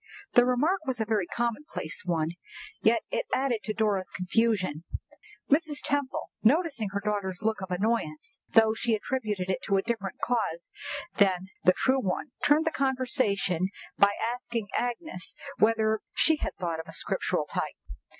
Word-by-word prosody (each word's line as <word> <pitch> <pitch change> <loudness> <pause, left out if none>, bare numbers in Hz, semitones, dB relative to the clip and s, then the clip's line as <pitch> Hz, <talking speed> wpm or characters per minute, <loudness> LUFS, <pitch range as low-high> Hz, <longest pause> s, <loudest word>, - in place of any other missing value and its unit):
The 245 0 +6
remark 310 +9 +2
was 255 -2 -1
a 220 - +1
very 210 -5 +1
commonplace 235 - -2
one, 165 -2 0 0.5
yet - - +4
it - - -1
added 260 -4 +1
to 215 - -1
Dora's 205 -4 +1
confusion. 185 -4 +1 0.6
Mrs. 295 0 +2
Temple, 285 -2 -1
noticing 275 - +2
her 200 +1 -2
daughter's 200 -2 -2
look 220 -2 0
of 190 - -5
annoyance, 180 -5 -1
though 220 -1 +5
she 225 0 +1
attributed 210 -5 -2
it - - -2
to 195 - +2
a 195 - +1
different 225 -5 -3
cause 220 -9 -1 0.5
than 190 -2 +3 0.2
the 185 - +7
true 260 +5 +2
one, 195 +8 -2
turned 300 +3 +4
the 320 - +2
conversation 245 - +1 0.3
by 200 0 +6
asking 235 -2 -2
Agnes 245 - -3 0.2
whether 220 0 +3 0.2
she 320 -1 +4
had - - -3
thought 170 -3 -2
of 160 - -7
a - - -10
Scriptural - - 0
type. - - -3
220 Hz, 155 wpm, -28 LUFS, 190-255 Hz, 0.6 s, the